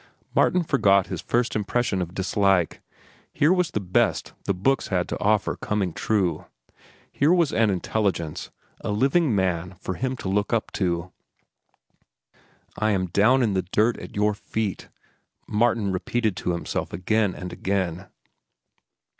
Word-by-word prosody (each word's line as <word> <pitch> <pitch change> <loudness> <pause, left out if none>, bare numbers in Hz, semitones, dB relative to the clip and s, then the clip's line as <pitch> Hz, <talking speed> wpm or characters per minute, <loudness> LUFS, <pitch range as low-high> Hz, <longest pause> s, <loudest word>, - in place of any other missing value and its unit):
Martin 180 - +3
forgot 100 - +3
his - - -4
first 120 0 0
impression 105 -1 0
of 90 +1 -5
dislike. 95 -2 +1 0.5
Here 155 +5 +3
was 180 -3 +1
the - - -2
best 90 -3 0
the 100 - +1
books 135 +9 +1
had 90 -2 0
to - - -3
offer 105 0 +1
coming 100 -5 -2
true. 95 -7 0 0.7
Here 145 +4 +2
was 170 -4 +3
an 110 -1 +3
intelligence, 95 -4 -1 0.3
a - - -5
living 135 +5 +2
man 90 -1 -1
for 95 - -4
him 130 +5 -3
to - - -6
look 100 +3 0
up 115 - 0
to. 90 -1 -1 1.7
"I 110 - +2
am 95 -3 0
down 120 +7 +4
in 110 -4 +1
the 95 - +1
dirt 110 +3 +3
at - - -10
your 105 +1 +2
feet," 105 -1 -4 0.6
Martin 110 -2 +1
repeated 105 +3 -1
to 90 - -1
himself 85 - -3
again 100 +3 +1
and 90 0 -7
again. 95 -1 -2
100 Hz, 145 wpm, -24 LUFS, 95-115 Hz, 1.7 s, down